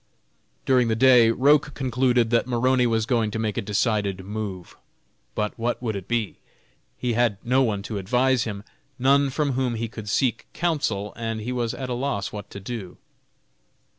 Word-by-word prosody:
During 125 -2 +3
the 110 - +1
day 125 -1 +6
Roch 140 +4 +3
concluded 125 -3 +1
that 120 +1 +2
Maroney 125 +1 +2
was 110 -1 +1
going 115 -2 +1
to 105 - -4
make 110 -2 -1
a - - -1
decided 100 -2 -1
move. 100 -3 -6 0.6
But 105 0 -2
what 120 +1 -1
would 115 -4 -3
it 95 -2 -6
be? 115 -3 -1 0.6
He 125 -2 -1
had 115 -3 +2
no 130 +3 +3
one 105 -6 0
to 105 -1 -4
advise 125 +5 +2
him; 100 -3 -5 0.3
none 140 +2 +3
from 145 +1 0
whom 125 -2 -1
he 115 +1 -2
could 110 -2 -8
seek 120 +2 0
counsel, 125 - -1
and 115 -1 -3
he 115 +4 -4
was 120 -2 -2
at 130 - -5
a 125 - -2
loss 120 -6 -2
what 105 -1 -8
to 100 - -8
do. 100 -2 -7
115 Hz, 180 wpm, -24 LUFS, 105-130 Hz, 0.6 s, day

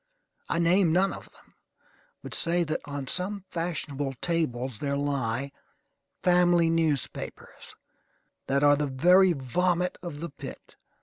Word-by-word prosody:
I - - 0
name 170 +1 +3
none 190 +3 +2
of - - -10
them; - - -23 0.7
but - - -8
say 175 +1 +1
that 155 -1 -2
on 145 -2 -5
some 190 +6 -2
fashionable 145 -5 -3
tables 130 -9 -2
there 140 -1 -1
lie 140 -2 -1 0.7
"family 175 -2 +4
newspapers" 160 -5 -3 0.7
that 140 +1 +1
are 145 0 +6
the 145 0 -1
very 180 +7 +5
vomit 175 +6 0
of 170 -5 -7
the 170 -1 -5
pit. 140 - -10
165 Hz, 130 wpm, -27 LUFS, 140-175 Hz, 0.7 s, are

